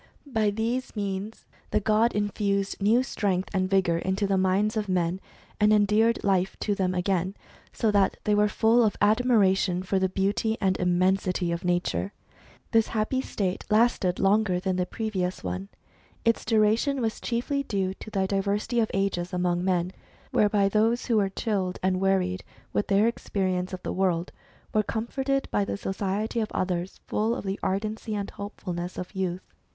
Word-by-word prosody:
By 220 Hz, -6 st, +1 dB
these 230 Hz, +5 st, -2 dB
means 200 Hz, +1 st, -4 dB, 0.2 s
the -, -, +2 dB
god 215 Hz, +3 st, +2 dB
infused 200 Hz, -1 st, -1 dB
new 225 Hz, +5 st, +4 dB
strength 195 Hz, -7 st, -1 dB
and 185 Hz, -1 st, 0 dB
vigour 185 Hz, -4 st, +2 dB
into 190 Hz, +3 st, -1 dB
the 195 Hz, 0 st, +1 dB
minds 190 Hz, +3 st, +2 dB
of 210 Hz, -2 st, -2 dB
men, 180 Hz, 0 st, 0 dB, 0.4 s
and 210 Hz, 0 st, +4 dB
endeared 215 Hz, +2 st, +3 dB
life 190 Hz, -2 st, +1 dB
to 210 Hz, -, +1 dB
them 185 Hz, -2 st, 0 dB
again, 185 Hz, +1 st, 0 dB, 0.4 s
so 220 Hz, -, +1 dB
that 200 Hz, -2 st, +2 dB
they 210 Hz, -, +2 dB
were 210 Hz, 0 st, +4 dB
full 225 Hz, +3 st, +3 dB
of 215 Hz, -, +1 dB
admiration 205 Hz, -5 st, +3 dB
for 190 Hz, +1 st, 0 dB
the 190 Hz, 0 st, +1 dB
beauty 200 Hz, +4 st, 0 dB
and 190 Hz, -2 st, +2 dB
immensity 180 Hz, 0 st, +1 dB
of 170 Hz, 0 st, -3 dB
nature. 180 Hz, +2 st, -1 dB, 0.6 s
This 225 Hz, -1 st, +4 dB
happy 225 Hz, +4 st, 0 dB
state 190 Hz, -7 st, -2 dB
lasted 215 Hz, -5 st, +3 dB
longer 195 Hz, -2 st, +2 dB
than 185 Hz, 0 st, -1 dB
the 180 Hz, 0 st, 0 dB
previous 190 Hz, -5 st, -3 dB
one. 90 Hz, +2 st, -4 dB, 0.6 s
Its 230 Hz, 0 st, +2 dB
duration 225 Hz, +5 st, +2 dB
was 225 Hz, -3 st, -2 dB
chiefly 250 Hz, +4 st, -1 dB
due 195 Hz, -7 st, -1 dB
to 215 Hz, -, -10 dB
the 195 Hz, -3 st, 0 dB
diversity 200 Hz, +4 st, 0 dB
of 220 Hz, -, +2 dB
ages 190 Hz, -3 st, -1 dB
among 180 Hz, -1 st, 0 dB
men, 180 Hz, -1 st, +1 dB, 0.4 s
whereby 205 Hz, -1 st, +3 dB
those 220 Hz, +4 st, +2 dB
who 230 Hz, -3 st, +2 dB
were 200 Hz, -2 st, +2 dB
chilled 195 Hz, -3 st, -2 dB
and 185 Hz, 0 st, +1 dB
wearied 185 Hz, -1 st, +1 dB, 0.3 s
with 205 Hz, -, 0 dB
their 205 Hz, +2 st, +4 dB
experience 185 Hz, -5 st, -1 dB
of 185 Hz, -1 st, -6 dB
the -, -, -3 dB
world, 180 Hz, -2 st, 0 dB, 0.4 s
were 215 Hz, -, +4 dB
comforted 265 Hz, +6 st, -2 dB
by 205 Hz, -, +2 dB
the 200 Hz, -, -3 dB
society 200 Hz, +4 st, -2 dB
of 215 Hz, -2 st, -2 dB
others 180 Hz, 0 st, -2 dB
full 220 Hz, +2 st, 0 dB
of -, -, -6 dB
the 195 Hz, +1 st, -2 dB
ardency 215 Hz, +3 st, -2 dB
and 200 Hz, -1 st, -3 dB
hopefulness 180 Hz, -3 st, -6 dB
of 180 Hz, +2 st, -6 dB
youth. 185 Hz, -2 st, -2 dB
200 Hz, 170 wpm, -26 LUFS, 185-215 Hz, 0.6 s, new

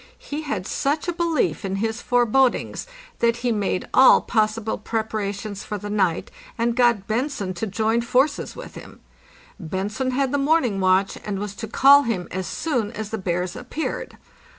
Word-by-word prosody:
He 295 Hz, +2 st, -6 dB
had 215 Hz, -12 st, -3 dB
such 295 Hz, -, -1 dB
a 350 Hz, -, 0 dB
belief 335 Hz, -7 st, 0 dB
in 195 Hz, -1 st, -2 dB
his 220 Hz, +3 st, -2 dB
forebodings 245 Hz, -, +1 dB, 0.3 s
that 235 Hz, 0 st, +2 dB
he 245 Hz, -, +3 dB
made 205 Hz, -4 st, -1 dB
all 260 Hz, -, +8 dB
possible 220 Hz, -1 st, 0 dB
prep 220 Hz, +1 st, -3 dB
arations 200 Hz, -1 st, -4 dB
for 210 Hz, -, -4 dB
the 205 Hz, +1 st, -6 dB
night 190 Hz, -5 st, 0 dB, 0.3 s
and 230 Hz, 0 st, 0 dB
got 240 Hz, -5 st, +3 dB
Bentzen 220 Hz, -4 st, -2 dB
to 200 Hz, +5 st, -3 dB
join 220 Hz, +3 st, +1 dB
forces 260 Hz, +5 st, +1 dB
with -, -, -9 dB
him. -, -, -12 dB, 0.6 s
Bentzen 200 Hz, +8 st, -3 dB
had 265 Hz, 0 st, 0 dB
the 285 Hz, -, +1 dB
morning 275 Hz, -8 st, +2 dB
watch, 190 Hz, +1 st, +2 dB
and 205 Hz, -2 st, -3 dB
was 205 Hz, 0 st, -4 dB
to 220 Hz, +2 st, -6 dB
call 275 Hz, +6 st, +7 dB
him 220 Hz, -9 st, -2 dB
as 185 Hz, 0 st, -3 dB
soon 245 Hz, -10 st, -1 dB
as 215 Hz, -1 st, -6 dB
the 220 Hz, -, -3 dB
bears 180 Hz, -1 st, -2 dB
appeared. 250 Hz, +6 st, -5 dB
220 Hz, 175 wpm, -23 LUFS, 200-260 Hz, 0.6 s, all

